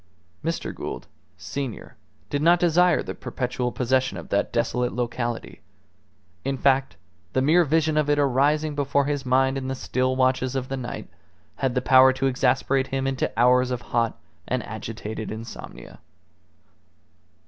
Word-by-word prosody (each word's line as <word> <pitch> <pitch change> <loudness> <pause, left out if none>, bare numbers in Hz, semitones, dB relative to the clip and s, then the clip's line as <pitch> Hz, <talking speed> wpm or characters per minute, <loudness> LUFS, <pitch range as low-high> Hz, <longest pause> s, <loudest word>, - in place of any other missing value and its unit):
Mr. 165 +1 -2
Gould, - - -6 0.3
senior, 135 -5 -6 0.4
did 145 - 0
not 170 +2 +5
desire 175 +1 +3
the - - -5
perpetual 125 -1 -3
possession 130 -4 0
of 85 - -9
that 100 0 0
desolate 120 +1 0
locality; 120 -1 -3 0.8
in 135 0 -1
fact, 135 0 +2 0.4
the 130 - +2
mere 165 +5 +5
vision 155 0 +1
of 150 -1 +2
it 145 - +3
arising 145 +3 +2
before 140 -1 +1
his 140 -2 -2
mind 130 +1 +2
in 130 - -5
the 135 - -2
still 130 0 -1
watches 130 0 +1
of 130 -1 -3
the 135 - -2
night 120 -2 -6 0.5
had 135 -2 -1
the 125 - 0
power 130 0 +7
to 130 +1 -2
exasperate 135 +1 +1
him 135 0 -2
into 135 -1 -1
hours 125 +1 +4
of 125 -1 -3
hot 115 -1 +1 0.3
and 125 -2 -1
agitated 110 0 -6
insomnia. 115 +1 -9
130 Hz, 150 wpm, -24 LUFS, 125-140 Hz, 0.8 s, power